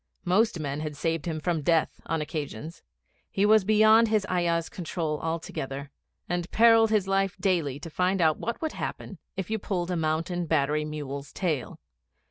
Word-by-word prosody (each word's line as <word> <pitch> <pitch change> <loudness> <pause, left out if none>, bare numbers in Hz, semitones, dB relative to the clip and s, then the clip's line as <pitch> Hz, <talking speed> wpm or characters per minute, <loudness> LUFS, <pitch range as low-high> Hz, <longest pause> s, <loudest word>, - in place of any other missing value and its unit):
Most 195 +1 +2
men 145 -1 -3
had 150 -1 -5
saved 165 -1 -1
him 160 -2 -2
from 165 0 -1
death 165 +1 +1
on 165 -1 -1
occasions. 155 +1 -6 0.5
He 195 - +1
was 215 -1 +5
beyond 215 +2 +5
his 215 -2 +1
ayah's 170 -2 +1
control 160 -3 -3
altogether, 140 -4 -4 0.4
and 175 0 -2
perilled 225 -1 +6
his 210 -3 +2
life 195 -1 +1
daily 165 -9 0
to 165 - -8
find 185 +4 +1
out 160 -3 +3
what 235 - -3
would 315 - -1
happen 195 - -6 0.2
if 190 +2 -4
you 220 - 0
pulled 185 -3 -2
a - - 0
Mountain 165 +2 -1
Battery 150 0 +1
mule's 145 -2 -6
tail. 155 -9 -2
170 Hz, 170 wpm, -27 LUFS, 155-195 Hz, 0.5 s, perilled